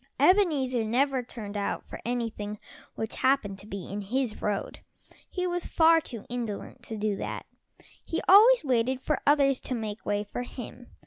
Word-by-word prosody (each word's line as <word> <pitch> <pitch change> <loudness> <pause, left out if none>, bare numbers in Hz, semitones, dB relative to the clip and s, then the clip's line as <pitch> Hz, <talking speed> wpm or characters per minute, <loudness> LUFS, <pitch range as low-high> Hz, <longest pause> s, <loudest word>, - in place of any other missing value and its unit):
Ebenezer 290 - +3
never 260 +4 +1
turned 215 -4 -8
out 200 -1 -2
for - - -8
anything 225 -3 -3 0.4
which 220 0 -4
happened 255 -7 +1
to 200 - -11
be 200 -3 -6
in 205 +1 -3
his 240 +3 -2
road. 205 -2 -2 0.5
He 365 -1 -2
was 355 -1 -1
far 325 0 +5
too 235 -8 -8
indolent 240 0 -5
to 220 - -5
do 210 -1 0
that - - -5 0.6
he 325 - -2
always 445 +5 +8
waited 255 -1 +1
for 300 - 0
others 280 -2 +4
to 255 - -4
make 215 -2 -5
way 205 0 0
for 210 +4 -5
him. 245 0 -8
245 Hz, 170 wpm, -28 LUFS, 210-275 Hz, 0.6 s, always